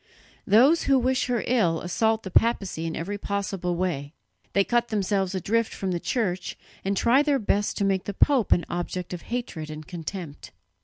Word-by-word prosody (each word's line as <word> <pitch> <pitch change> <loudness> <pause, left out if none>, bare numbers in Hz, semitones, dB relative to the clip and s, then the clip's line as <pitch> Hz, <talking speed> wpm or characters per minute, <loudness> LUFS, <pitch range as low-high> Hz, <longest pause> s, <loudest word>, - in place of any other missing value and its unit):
Those 265 +11 +5
who 275 -1 +4
wish 255 0 +1
her 245 -3 0
ill 180 -10 +2
assault 220 +5 0
the 190 - -7
papacy 195 -7 +1
in 160 - -4
every 200 +5 -4
possible 195 -3 -2
way; 165 -5 -2 0.4
they 200 - +4
cut 240 +3 +1
themselves 195 -3 0
adrift 225 +5 0
from 190 -1 -2
the 175 - -1
Church, 190 -4 -2 0.3
and 195 0 -1
try 245 +7 +4
their 290 -2 +2
best 205 -3 0
to 200 - +1
make 190 -1 0
the 205 - -3
pope 265 -3 +3
an 175 - +4
object 175 +1 -4
of 175 - -5
hatred 230 -11 -5
and 155 0 -8
contempt. 170 -2 -7
195 Hz, 185 wpm, -25 LUFS, 175-230 Hz, 0.4 s, Those